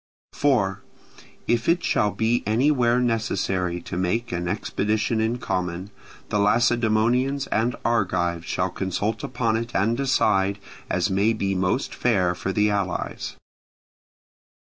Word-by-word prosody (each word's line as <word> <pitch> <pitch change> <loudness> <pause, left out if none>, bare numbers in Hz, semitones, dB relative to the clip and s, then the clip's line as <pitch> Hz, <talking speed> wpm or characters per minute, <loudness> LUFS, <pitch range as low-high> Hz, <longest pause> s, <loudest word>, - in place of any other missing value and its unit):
4. 115 -10 +1 0.7
If 120 +3 +1
it 170 0 +2
shall 105 - +2
be 110 +4 0
anywhere 125 +1 +3
necessary 95 -7 0
to - - -6
make 95 +7 -1
an 90 0 -2
expedition 110 +3 -1
in 115 +2 0
common, 90 -3 -3 0.4
the 105 - 0
Lacedaemonians 120 +5 +2
and 115 +2 +1
Argives 90 -7 0
shall 90 +3 -1
consult 100 +3 -2
upon 115 -3 0
it 115 +1 -5
and 110 +4 +2
decide, 100 -7 +2 0.3
as - - 0
may 100 +4 +2
be 100 -3 -1
most 95 +8 0
fair 95 -8 +1
for 90 +2 -3
the 105 +1 +2
allies. 100 -3 -3
110 Hz, 125 wpm, -24 LUFS, 95-120 Hz, 0.7 s, anywhere